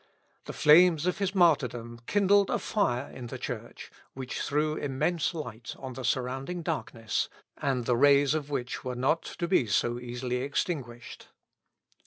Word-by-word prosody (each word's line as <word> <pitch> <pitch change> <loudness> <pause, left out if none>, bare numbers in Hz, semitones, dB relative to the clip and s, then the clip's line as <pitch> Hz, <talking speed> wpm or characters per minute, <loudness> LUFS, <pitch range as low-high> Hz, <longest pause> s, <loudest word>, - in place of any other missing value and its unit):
The - - -6
flames 165 +1 +6
of 180 +2 0
his 195 -1 -1
martyrdom 125 - +2
kindled 200 0 +3
a - - +1
fire 140 - -1
in 125 -2 -8
the - - -6
Church, - - -7 0.2
which 130 -1 -5
threw 150 +1 0
immense 145 +5 -1
light 120 -7 -6
on 130 -1 -7
the 130 - -7
surrounding 135 +8 -2
darkness, 120 -9 -2 0.3
and 130 -4 -1
the 125 - +2
rays 140 +2 +5
of 150 -2 -3
which 130 -3 -3
were 125 -1 -4
not 135 +7 +1
to 170 - -5
be 170 - +2
so 120 +4 +1
easily 125 +1 -3
extinguished. 130 -3 -4
135 Hz, 155 wpm, -28 LUFS, 125-165 Hz, 0.3 s, flames